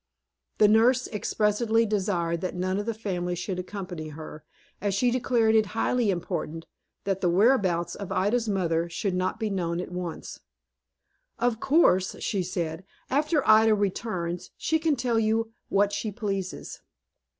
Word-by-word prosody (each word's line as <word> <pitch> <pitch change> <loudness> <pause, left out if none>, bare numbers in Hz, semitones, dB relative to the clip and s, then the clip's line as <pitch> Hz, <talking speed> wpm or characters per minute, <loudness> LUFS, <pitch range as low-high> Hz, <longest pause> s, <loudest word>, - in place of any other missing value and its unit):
The 210 - +6
nurse 235 +4 +4
expressly 220 +2 +1
desired 185 -5 -1
that 185 - -3
none 185 +2 -1
of 205 - -4
the 230 - 0
family 180 -5 -3
should 180 +1 -4
accompany 180 -4 -6
her, 155 0 -9 0.4
as 200 -2 0
she 245 +4 +2
declared 240 -3 +2
it 220 -2 +4
highly 245 -4 +1
important 165 -3 -3 0.4
that 195 -1 -1
the 180 - +2
whereabouts 185 -3 +3
of 200 - -7
Ida's 220 +4 +1
mother 170 -4 0
should 185 +3 -2
not 185 +1 -1
be 220 -2 -1
known 170 -3 -1
at 180 - -5
once. 180 -2 -6 1.0
"Of 235 -1 0
course," 250 - +3
she 200 -4 -1
said, 170 -1 -3 0.3
"after 295 0 +1
Ida 220 0 +6
returns, 185 -4 -2
she 320 0 +1
can 315 -2 +2
tell 240 -3 0
you 225 +1 +1 0.2
what 200 +1 +2
she 210 +1 -2
pleases. 195 -3 -4
200 Hz, 150 wpm, -27 LUFS, 180-225 Hz, 1.0 s, The